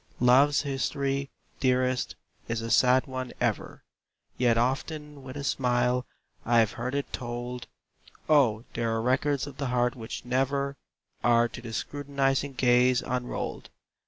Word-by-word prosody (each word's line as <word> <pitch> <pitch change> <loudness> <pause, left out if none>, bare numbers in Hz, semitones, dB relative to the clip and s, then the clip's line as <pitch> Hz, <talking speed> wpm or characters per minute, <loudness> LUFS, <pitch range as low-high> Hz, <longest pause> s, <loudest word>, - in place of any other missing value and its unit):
Love's 135 +4 +5
history, 140 0 -1 0.3
dearest, 130 -1 +1 0.3
is 115 0 -1
a 115 0 -4
sad 125 +3 +5
one 130 -2 -5
ever, - - -2 0.5
Yet 120 -2 +3
often 145 +4 -2
with 130 +1 -8
a 140 - -5
smile 125 -1 +1 0.4
I've 115 -2 +3
heard 125 +4 -4
it 140 - -3
told! 120 0 -5 0.6
Oh, 125 -8 +4
there 115 0 -1
are - - 0
records 135 +3 +1
of 145 -2 -10
the 140 - -2
heart 125 0 +1
which 115 0 -7
never 140 +2 0 0.5
Are 120 0 +4
to 120 - -9
the 115 -1 -7
scrutinizing 140 +1 -1
gaze 125 0 +3
unrolled! 125 0 -4
130 Hz, 135 wpm, -28 LUFS, 120-140 Hz, 0.6 s, Love's